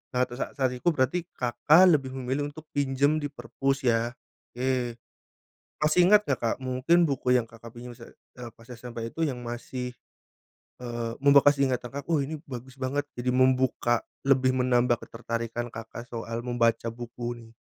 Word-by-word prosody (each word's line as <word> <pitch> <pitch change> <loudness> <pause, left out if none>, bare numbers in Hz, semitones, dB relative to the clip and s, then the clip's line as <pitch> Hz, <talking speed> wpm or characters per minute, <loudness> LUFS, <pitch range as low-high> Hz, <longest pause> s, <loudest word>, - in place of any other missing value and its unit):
Nah, 125 - +3
terus 125 +1 -6
sa - - -1
saat 130 -2 +1
itu, 125 +7 -6
berarti 165 +3 +1
Kakak 125 +8 +4 0.2
lebih 130 -1 -8
memilih 135 +3 -2
untuk 155 +2 -10
pinjam 140 +2 +1
di 145 - -2
perpus 135 -1 -2
ya, 120 0 +1 0.4
oke. 125 -2 -1 0.8
Masih 150 +3 +2
ingat 210 0 +6
nggak, 140 - 0
Kak, 115 - +1
mungkin 130 +6 +1
buku 135 -2 -3
yang 115 - -5
Kakak 115 0 -13
pinjam, 120 0 -10
sa 115 - -13 0.3
eee, 120 -2 -8
pas 115 +1 -20
SMP 120 -1 -6
itu, 165 - -6
yang 130 -5 -3
masih, 125 +1 -5 0.9
eee, 120 -1 -4
membekas 140 0 +6
di - - +5
ingatan, 125 -1 -2
Kak, - - -26
"Oh 160 - +3
ini, 155 +3 -4
bagus 125 +1 -8
banget!" 145 +3 -1
Jadi 125 +1 -1
membuka, 130 -2 +2 0.2
lebih 130 -1 +3
menambah 125 -1 +2
ketertarikan 115 0 -4
Kakak 115 +1 -8
soal 115 0 -5
membaca 115 -1 +1
buku 120 0 -7
nih? 115 -1 -14
125 Hz, 170 wpm, -27 LUFS, 120-135 Hz, 0.9 s, ingat